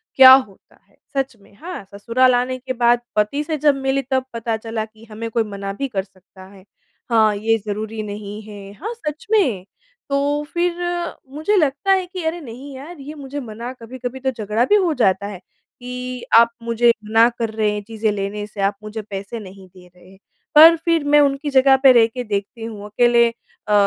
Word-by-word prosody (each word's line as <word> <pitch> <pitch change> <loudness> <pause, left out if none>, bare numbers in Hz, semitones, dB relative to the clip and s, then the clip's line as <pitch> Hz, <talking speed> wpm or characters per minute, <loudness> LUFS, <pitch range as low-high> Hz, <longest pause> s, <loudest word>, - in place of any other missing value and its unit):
क्या 260 -1 +10
होता 255 -8 0
है? - - -31 0.2
सच 270 -2 -1
में। 200 - -22
हाँ, 345 - -8
ससुराल 245 +5 +2
आने 250 +1 -1
के 255 0 -5
बाद 240 0 +3
पति 215 +8 +1
से 310 0 -3
जब 290 -1 +3
मिली, 270 0 0
तब 260 0 -1
पता 230 -1 -2
चला 225 0 -4
कि 220 +1 -19
हमें 230 +2 -5
कोई 230 -1 +1
मना 200 -1 -6
भी 275 +7 -3
कर 195 -6 -3
सकता 190 0 -18
है। 190 0 -16 0.5
हाँ, 220 -3 +4
ये 225 +2 +1
ज़रूरी 215 +1 -4
नहीं 205 0 -7
है, 205 -2 -11
हाँ 425 - -6
सच 305 -10 -7
में 255 - +2 0.4
तो 285 +1 0
फिर 345 0 +1 0.6
मुझे 315 +8 0
लगता 300 +3 +1
है 375 -1 +3
कि 365 -1 -7
अरे, 325 +2 -1
नहीं 265 +1 -10
यार 295 +4 -10
ये 285 +2 -8
मुझे 285 -1 -7
मना 235 -1 -7
कभी-कभी 250 +1 -7
तो 265 0 -1
झगड़ा 215 0 -1
भी 415 - +4
हो 365 -6 +2
जाता 195 -4 +1
है 205 -2 -7 0.4
कि 250 0 -6
आप 235 0 +7
मुझे 235 +1 +3
मना 225 +2 +5
कर 230 -1 -1
रहे 215 -1 +1
हैं 210 - -3
चीज़ें 220 0 -2
लेने 205 +1 -4
से, 205 -1 -7
आप 200 +1 +1
मुझे 215 +1 -6
पैसे 200 +2 -7
नहीं 190 -2 -12
दे 180 0 -18
रहे 180 0 -21
हैं। 190 - -17 0.4
पर 325 +2 +10
फिर 335 -2 +2
मैं 290 +1 +4
उनकी 285 0 +1
जगह 270 0 +5
पे 270 - +9
रह 235 -2 +6
के 250 +2 -6
देखती 210 +1 -4
हूँ, 215 -2 -7
अकेले 235 +2 +3
अ, 230 -2 -8
235 Hz, 205 wpm, -20 LUFS, 210-275 Hz, 0.6 s, क्या